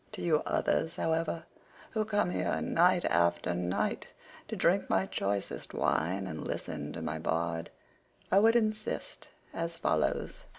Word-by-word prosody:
To - - -5
you 160 -3 +3
others, 165 +1 +1
however, 165 -1 0 0.5
who 215 -1 0
come 205 -4 +1
here - - 0
night 175 +1 +3
after 85 +1 +2
night 90 0 -1 0.4
to - - -4
drink - - +2
my - - +3
choicest 100 -11 -3
wine 95 +5 +1
and 80 -4 -5
listen 75 -2 -4
to 80 - -5
my 80 0 -3
bard, 80 +1 -1 0.6
I 195 - +7
would 225 +3 +5
insist 215 -1 -1 0.3
as 165 0 -3
follows. 75 - 0
100 Hz, 140 wpm, -31 LUFS, -, 0.6 s, I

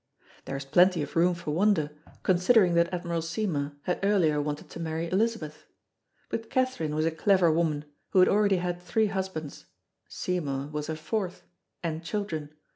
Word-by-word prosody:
There 135 - -4
is 140 - -6
plenty 175 +3 +4
of - - -8
room 175 +2 +4
for 170 -3 -5
wonder, 165 -3 +2 0.3
considering 185 +1 +4
that 170 +1 +3
Admiral 170 -2 -2
Seymour 165 -4 -2
had 180 - -1
earlier 180 -7 +3
wanted 150 0 -4
to - - -8
marry 165 0 -2
Elizabeth. 190 -7 -1 0.6
But 225 0 -4
Catherine 255 - 0
was 155 +1 +1
a 165 - +2
clever 175 +1 +3
woman, 155 -2 0 0.2
who - - -1
had 185 - +7
already 205 -1 +3
had 175 0 -2
three 220 +5 +1
husbands 185 -6 -4 0.4
Seymour 145 -6 -3
was 150 -1 -3
her 160 - -2
fourth 185 +4 -3 0.4
and 165 0 -3
children. 165 -4 -3
170 Hz, 165 wpm, -28 LUFS, 155-190 Hz, 0.6 s, had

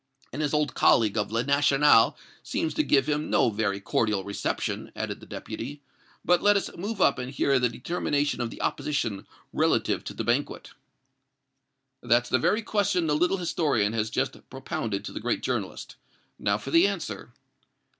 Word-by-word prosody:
"And 145 - -3
his 150 -2 0
old 150 -1 0
colleague 110 -3 +4
of 105 -1 -1
'Le 115 +1 0
National' 140 -2 +4 0.2
seems 155 - -2
to - - +1
give 140 -2 +2
him 150 0 -1
no 115 - +3
very 100 -2 -1
cordial 105 0 0
reception," 100 +1 -3
added - - -4
the - - -14
Deputy. 140 +5 -7 0.4
"But 175 0 +4
let 205 0 +5
us 200 - -4
move 205 +4 -5
up 140 - +3
and 125 +1 -5
hear 135 0 +2
the 125 -1 +2
determination 145 0 -1
of 120 - -2
the - - -8
opposition 110 -10 -2 0.3
relative - - +1
to - - -6
the - - -3
banquet." - - -1 1.3
"That's 120 +1 +2
the 130 - +2
very 215 - +1
question 200 -5 +1
the 150 -2 +1
little 180 +5 +2
historian 145 - 0
has 110 -1 -1
just - - -2
propounded 100 -4 -4
to - - -6
the - - -6
great - - -2
journalist. - - -4 0.4
Now 100 0 +1
for 115 +6 -8
the 165 +5 +6
answer." 140 - -5
140 Hz, 175 wpm, -26 LUFS, 115-160 Hz, 1.3 s, the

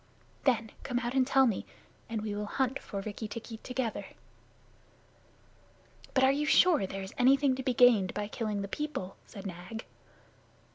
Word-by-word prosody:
Then 230 -5 +2
come 250 -3 -2
out 245 0 -1
and 260 -1 +3
tell 270 -1 +5
me, 225 -6 0 0.5
and 220 -2 -3
we 215 -1 -3
will 210 0 -3
hunt 265 +3 0
for 200 - -5
Rikki 215 +2 -5
tikki 225 +1 -7
together." 250 -1 -3 2.1
"But 265 - +4
are 265 - +6
you 295 +2 0
sure 350 +1 +6
that 195 -2 -2
there 195 0 -5
is 190 - -8
anything 270 +2 +5
to - - -2
be 255 -2 -1
gained 225 -7 +5
by 205 0 -2
killing 210 -2 -2
the - - -4
people?" 200 -6 -4
said 195 - -10
Nag. 185 +5 -7
230 Hz, 175 wpm, -31 LUFS, 205-265 Hz, 2.1 s, are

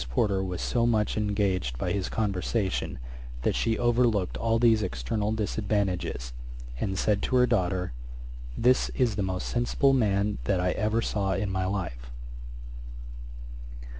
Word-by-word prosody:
Porter 95 - +1
was 90 -2 -4
so 120 -1 +1
much 110 -3 +1
engaged 100 - 0
by 90 - -2
his 95 0 -1
conversation 100 -1 -1 0.5
that - - +2
she 115 0 0
overlooked 120 -5 +2
all 115 0 +1
these 115 -2 +4
external 95 - -2
disadvantages, 100 - -1 0.5
and 95 +4 -2
said 105 0 +1
to 130 - 0
her 125 0 +6
daughter, 95 - 0 0.6
'this 125 +2 +3
is 120 -5 +2
the 105 - -1
most 95 -1 -2
sensible 120 +3 +2
man 105 -4 +1
that 95 -3 +1
I 90 0 +1
ever 110 +4 0
saw 100 -2 0
in 100 0 -1
my 95 -1 -1
life.' 85 -12 -4
100 Hz, 140 wpm, -27 LUFS, 95-115 Hz, 0.6 s, her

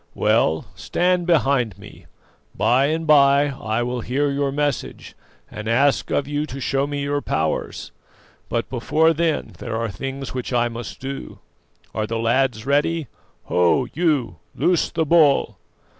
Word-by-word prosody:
Well, 80 0 +2
stand 180 0 0
behind 135 - +2
me: - - -14 0.5
by 130 +3 +3
and 160 +2 -1
by 140 -1 +5
I 120 -4 -2
will 125 0 -3
hear 140 +5 0
your 140 0 0
message 145 -2 -3 0.3
and 105 0 -8
ask 135 +5 +2
of 140 - 0
you 145 +1 -2
to 135 0 -7
show 135 +1 0
me 145 -1 -3
your 145 0 -1
powers; 80 - -2 0.6
but 115 0 -1
before 155 +6 +2
then 165 0 -1
there 115 -2 -4
are 115 0 -2
things 135 +7 -6
which 130 0 -4
I 120 -1 +2
must 115 -1 -7
do. 135 +1 -6 0.6
Are 110 0 -2
the 115 - -2
lads 115 0 +1
ready? 145 0 +1 0.3
Ho, 90 +9 +2
you, 145 - 0 0.2
loose 175 -2 +2
the 165 -1 -1
bull!" 150 -3 +3
135 Hz, 150 wpm, -22 LUFS, 120-145 Hz, 0.6 s, by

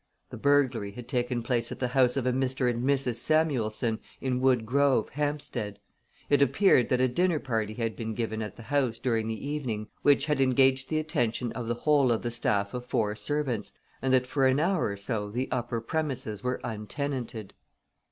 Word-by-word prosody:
The - - -6
burglary 130 -8 +2
had 120 +2 -9
taken 125 -2 -1
place 120 -1 0
at - - -5
the 125 - 0
house 125 0 +3
of 130 - 0
a 125 - +2
Mr. 130 0 0
and 120 0 0
Mrs. 130 -3 +1
Samuelson, 120 -8 +1 0.2
in 130 -1 -1
Wood 130 -4 +3
Grove, 135 -1 +2
Hampstead. 140 -8 -3 0.5
It 145 -1 +3
appeared 140 - +4
that 125 - +2
a 130 - +4
dinner 175 +6 +1
party 110 -6 -2
had 115 -1 -2
been 110 -2 -4
given 110 -1 -2
at 105 - -5
the 115 - -11
house 130 -3 0
during 115 -3 0
the 115 +5 -4
evening, 120 -8 -3
which 140 -1 +4
had 150 -3 +1
engaged 130 0 +3
the 155 - 0
attention 120 -6 -1
of 120 -2 -5
the 120 - 0
whole 140 0 +3
of 115 - 0
the 120 - -2
staff 100 -4 0
of 125 0 -5
four 105 -4 0
servants, 120 0 -2 0.3
and 130 - 0
that 130 -1 +4
for 135 +1 +2
an 130 +2 +3
hour 175 +2 +1
or 100 -1 -4
so 105 0 -3
the 125 +5 -2
upper 120 -1 -1
premises 130 -5 -3
were 125 +2 -2
untenanted. 115 -1 -4
125 Hz, 195 wpm, -28 LUFS, 115-140 Hz, 0.5 s, appeared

